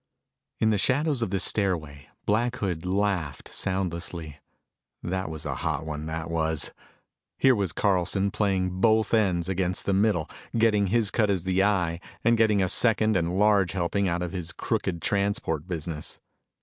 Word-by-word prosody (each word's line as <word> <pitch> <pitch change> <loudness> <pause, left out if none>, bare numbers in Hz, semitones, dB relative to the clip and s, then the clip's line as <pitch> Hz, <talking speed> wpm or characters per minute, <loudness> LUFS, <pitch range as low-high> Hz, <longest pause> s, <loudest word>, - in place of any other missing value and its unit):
In 110 - +3
the 105 - +1
shadows 140 - +1
of 115 - 0
the 95 +1 -1
stairway, 80 -10 -1 0.2
Black 120 +4 +1
Hood 90 -6 -3
laughed 95 -7 -1
soundlessly. 85 -5 -3 0.6
That 95 -1 -2
was 80 -2 -7
a - - -2
hot - - -2
one, 75 0 -5
that 80 0 -4
was! 80 -2 0 0.7
Here 135 -1 +5
was 100 -7 -1
Carlson, 95 +1 +1
playing 95 -3 0
both 110 0 +3
ends 95 -6 +2
against 90 -1 -1
the 100 - +1
middle, 95 -5 +2 0.3
getting 105 -3 +3
his 110 0 +1
cut 110 -3 +2
as 95 -4 0
the 95 +1 +2
Eye 90 -5 +1 0.2
and 115 +1 +4
getting 110 -3 +3
a - - +1
second 110 +1 +3
and 85 0 0
large 100 -3 +3
helping 95 +2 0
out 85 0 -1
of 90 - -4
his 90 -3 -5
crooked 85 -3 -2
transport 100 -5 0
business. 80 -3 -4
95 Hz, 160 wpm, -26 LUFS, 85-105 Hz, 0.7 s, Here